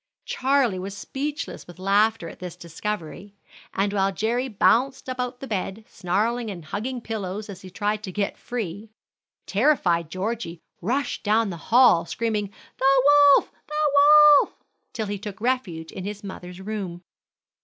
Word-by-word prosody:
Charlie 260 -7 +1
was 195 +2 -6
speechless 290 +8 -5
with 175 - -12
laughter 205 +1 +2
at - - -11
this 180 -2 -7
discovery, 180 +2 -6 0.4
and 200 +1 0
while 195 -1 +2
Jerry 230 +7 -1
bounced 255 +4 +2
about 250 -1 -4
the - - -5
bed 210 -1 -4
snarling 220 +6 -1
and 175 -6 -7
hugging 245 +8 -4
pillows 210 -2 -5
as 190 -1 -10
he 185 - -10
tried 210 +3 -2
to 190 - -6
get 200 +1 -2
free, 215 -3 -5 0.6
terrified 195 - +2
Georgie 185 -1 -4 0.2
rushed 250 +8 -1
down 215 0 +2
the 170 - -6
hall 225 -9 +6
screaming, 215 -1 -1 0.3
"The 270 0 +4 0.3
wolf! - - -3 0.2
the 300 -1 0 0.5
wolf!" - - -2 0.4
till 220 - -3
he 205 -1 -4
took 200 -1 -7
refuge 210 -10 -2
in 190 - -7
his 205 +1 -6
mother's 180 -2 -8
room. 190 -3 -5
210 Hz, 150 wpm, -24 LUFS, 185-240 Hz, 0.6 s, hall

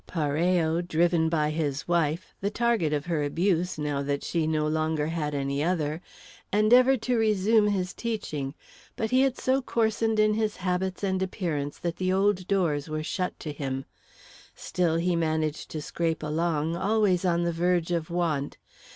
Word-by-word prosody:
Parello, 165 +1 +1
driven 170 -1 +2
by 155 -2 +1
his 150 -2 -2
wife, 170 0 0
the 200 - 0
target 230 -8 +1
of 150 -1 -1
her 165 -4 -1
abuse 175 +4 0
now 145 -2 -1
that 140 0 -2
she 165 -2 -1
no 155 -1 +1
longer 155 -1 0
had 155 -2 -2
any 140 +1 -1
other, 160 -2 -1 0.5
endeavoured 245 +4 +5
to 245 0 +1
resume 215 0 +3
his 185 -3 -1
teaching, 155 - -4 0.4
but 220 -1 -2
he 255 +1 +4
had 265 -2 +2
so 265 +1 +1
coarsened 225 -2 0
in 215 0 +4 0.2
habits 185 0 -2
and 190 -1 0
appearance 160 -7 -2
that 170 -1 -3
the 185 0 0
old 190 -1 +1
doors 165 -7 0
were 155 0 -3
shut 180 +3 -3
to 155 - -5
him. 135 -2 -4 0.7
Still, 170 -3 0
he 175 +1 +1
managed 155 -2 -1
to 155 -2 -5
scrape 165 -1 -2
along, 160 +1 0
always 200 -1 +2
on 175 -2 +2
the 170 0 0
verge 175 0 +1
of 165 -2 -1
want. 165 -5 -1
170 Hz, 165 wpm, -27 LUFS, 155-190 Hz, 0.7 s, endeavoured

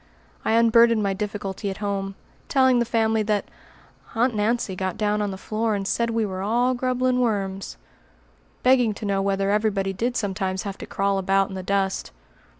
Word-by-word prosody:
I - - +1
unburdened 230 -1 +5
my 195 -1 +1
difficulty 200 0 -4
at 190 - -5
home, 195 -2 -3 0.3
telling 260 -2 +4
the 235 - +2
family 225 -1 +1
that 210 -1 0 0.7
"Aunt 240 +2 +2
Nancy 210 -1 0
got 185 -1 -3
down 210 0 0
on 205 - -1
the 190 - -5
floor 215 +2 -1
and 195 -1 -3
said 235 +2 0
we 225 -1 0
were 190 -2 -4
all 240 +5 +2
grubbelin' 255 0 0
worms," 195 - -2 0.9
begging 250 -4 +4
to 215 - -7
know 195 -1 +1
whether 195 0 0
everybody 205 -2 0
did 240 +5 -1
sometimes 190 -2 -2
have 200 -1 -6
to - - -7
crawl 195 0 0
about 195 +1 +2
in - - -8
the 190 - -4
dust. 195 0 -1
210 Hz, 180 wpm, -24 LUFS, 195-230 Hz, 0.9 s, unburdened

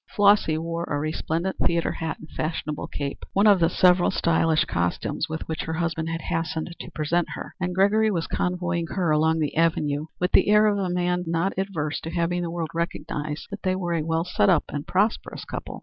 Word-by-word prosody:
Flossy 200 -6 +4
wore 165 +1 -3
a 145 - -2
resplendent 160 +4 -2
theatre 170 -1 +1
hat 160 0 -4
and 155 - -12
fashionable 155 -1 -3
cape 140 -1 -5
one 200 +2 +3
of 205 -3 +6
the 165 -1 +4
several 180 0 +4
stylish 165 -1 +2
costumes 85 - -1
with 160 0 -5
which 160 -1 -3
her 160 - -3
husband 165 -1 -1
had 165 0 -3
hastened 165 +1 -3
to - - -7
present 160 +3 0
her, - - -7
and 180 0 -1
Gregory 210 +3 +4
was 170 -5 -1
convoying 175 -2 -1
her 175 -3 0
along 160 +1 +3
the 150 -3 -1
Avenue 155 -2 +1
with 180 +1 0
the - - +4
air 210 +1 +6
of 205 -1 +2
a 190 -2 -1
man 180 0 0
not 170 +4 0
averse 175 -6 -2
to 165 - -5
have 170 0 0
the 175 0 0
world 165 -2 -3
recognize 155 -3 -3
that 200 0 -6
they 185 -1 0
were 175 -2 -2
a 165 - +1
well 165 +1 0
set 205 +3 +2
up 175 -5 +4
and 145 0 -5
prosperous 205 +4 0
couple. - - -6
170 Hz, 210 wpm, -25 LUFS, 160-180 Hz, -, of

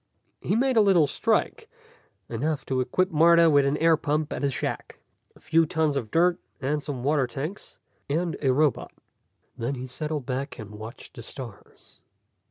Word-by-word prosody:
He - - 0
made 260 +1 +2
a - - +7
little 190 -6 +5
strike, 140 - -1 0.6
enough 140 +5 -2
to 130 -1 0
equip 185 +9 0
Martha 165 +1 +6
with 140 -1 +4
an 140 +2 +1
air 165 +1 +4
pump 150 0 -1
and - - -4
a 140 - +2
shack, 130 - -4 0.4
a - - -19
few 165 0 +2
tons 155 -2 0
of 120 -6 -3
dirt 175 +4 +3 0.2
and 145 +2 -1
some 140 -4 -5
water 140 -2 +2
tanks, 145 - -7 0.3
and 165 +2 0
a 135 -3 +3
robot. 145 +1 +1 0.7
Then 120 +4 -2
he 130 0 -6
settled 150 +2 -4
back 135 +2 -4
and 105 -2 -9
watched 110 +3 -9
the 120 - -8
stars. 115 -3 -11
145 Hz, 175 wpm, -26 LUFS, 130-165 Hz, 0.7 s, a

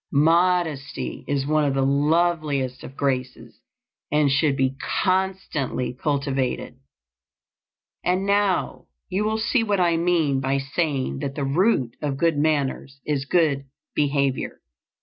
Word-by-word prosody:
Modesty 160 -1 +1
is 140 -1 0
one 155 +1 +2
of 140 -2 +1
the 135 - +2
loveliest 145 -2 +1
of 135 - -10
graces, 130 -2 -3 0.5
and 150 -1 +3
should 140 0 +2
be 135 -1 +1 0.3
constantly 185 -10 -1
cultivated. 135 -1 -1 1.3
And 185 +2 +1
now 200 -2 +1 0.2
you 195 +2 0
will 220 +1 0
see 230 +2 +1
what 205 -3 0
I 170 -2 +3
mean 165 -5 +2
by 135 +1 0
saying 135 -1 -1
that 140 -1 -4
the 145 - -2
root 140 - +1
of 145 -3 -2
good 165 +1 +2
manners 145 -2 -1
is 140 -2 -1
good 145 -4 +2 0.3
behavior. 140 -2 0
145 Hz, 130 wpm, -24 LUFS, 135-175 Hz, 1.3 s, and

